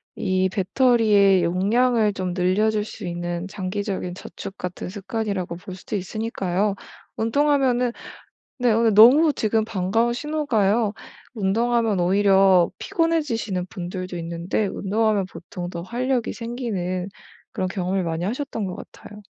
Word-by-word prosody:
이 185 0 0
배터리의 205 -2 +3
용량을 215 +5 +2
좀 185 -2 -3
늘려줄 205 +4 +1
수 200 -3 -8
있는 175 +1 -4
장기적인 190 -1 -4
저축 190 +1 -9
같은 180 0 -5
습관이라고 200 -3 -3
볼 185 +2 -9
수도 185 +3 -6
있으니까요. 200 -1 -1 0.4
운동하면은 250 0 +2 0.7
네 245 -2 +3
오늘 225 -1 +3
너무 275 +9 +7
지금 220 -2 0
반가운 225 +3 0
신호가요. 235 -7 0 0.4
운동하면 225 0 +1
오히려 190 -1 +4
피곤해지시는 295 - -1
분들도 185 -1 -6
있는데 170 +5 -2
운동하면 205 +1 0
보통 175 0 -7
더 170 -1 -6
활력이 245 +4 -1
생기는 200 -7 -3 0.4
그런 185 - -2
경험을 185 0 -1
많이 165 +1 -2
하셨던 235 +2 -3
것 180 - -5
같아요. 210 0 -12
205 Hz, 315 characters per minute, -23 LUFS, 185-230 Hz, 0.7 s, 너무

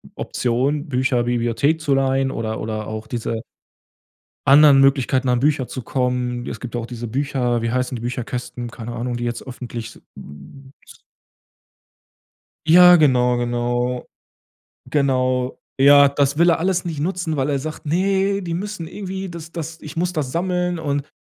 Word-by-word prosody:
Option, 135 +6 -1
Bücher-Bibliothek 125 +2 0
zu 145 -3 +1
leihen 135 0 +1
oder 110 -2 -4
oder 110 -1 -4
auch 110 0 -6
diese 115 -1 -3 1.1
anderen 140 0 +7
Möglichkeiten, 135 -1 +2
an 125 -1 +2
Bücher 140 -2 +1
zu 130 - -6
kommen. 125 -1 -2
Es 110 - -6
gibt 120 +1 -6
auch 115 -1 -3
diese 120 -1 -6
Bücher, 125 -2 -1
wie 115 - -1
heißen 125 0 -1
die - - -7
Bücherkästen? 120 0 -5
Keine 115 +1 -8
Ahnung, 120 +1 -3
die 120 - -4
jetzt 120 0 -4
öffentlich 120 -3 -7
s - - -18
hm 105 - -13 2.0
Ja 180 +1 +9
genau, 125 -6 +3
genau. 120 +1 -1 0.8
Genau, 130 -3 0 0.2
ja 140 +1 +7
das 140 0 +1
will 170 +2 +5
er 165 - +2
alles 180 +1 0
nicht 160 -4 -4
nutzen, 170 -1 -2
weil 135 +1 0
er 140 -2 0
sagt: 155 +2 -7
„Ne, 195 +4 +1
die 170 - -4
müssen 195 -2 -5
irgendwie, 190 0 -6
das 165 -1 -9
das 165 -1 -6
ich 155 +2 -10
muss 180 +2 0
das 145 -5 -2
sammeln 180 0 -1
und 145 -2 -2
135 Hz, 155 wpm, -21 LUFS, 120-155 Hz, 2.0 s, Ja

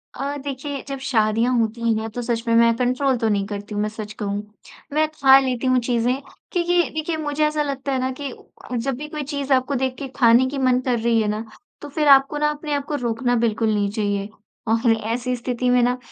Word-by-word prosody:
अ, 280 +1 -3
देखिए, 280 0 -5
जब 275 -1 -5
शादियाँ 230 -1 +1
होती 230 0 0
हैं, 225 - -4
तो 245 +3 -5
सच 235 -1 -2
में 230 - +2
मैं 230 0 +5
कंट्रोल 255 +2 +1
तो 225 -1 0
नहीं 200 -2 +1
करती 205 0 -6
हूँ, 205 - -1
मैं 210 - -1
सच 215 -1 -7
कहूँ। 205 0 -2 0.5
मैं 310 +1 +3
खा 270 -3 +6
लेती 260 -1 -1
हूँ 255 0 +4
चीज़ें 240 0 +1 0.4
क्योंकि 350 0 +2
देखिए, 315 +1 -2
मुझे 305 0 0
ऐसा 300 0 0
लगता 275 -1 -3
है 265 - 0
ना 260 +1 -1
कि 280 -3 -4 0.5
जब 260 +3 -1
भी 300 +3 -6
कोई 300 -1 -4
चीज़ 280 -1 -1
आपको 260 +2 +1
देख 260 0 -1
के 275 - -4
खाने 240 -1 +5
की 280 - -5
मन 255 -2 +3
कर 245 -3 0
रही 230 0 +2
है 215 - 0
ना, 210 +2 -2 0.4
तो 290 - -8
फिर 300 +1 0
आपको 275 +1 +6
ना 300 0 +2
अपने 300 0 -4
आप 285 -1 -1
को 295 - -3
रोकना 245 -1 0
बिल्कुल 225 -1 +1
नहीं 205 -1 +1
चाहिए 205 -1 -2 0.4
और 230 +1 +3
ऐसी 235 +3 -2
स्थिति 250 0 -2
में 245 0 +4
ना, 245 +1 +1
250 Hz, 225 wpm, -22 LUFS, 230-280 Hz, 0.5 s, खा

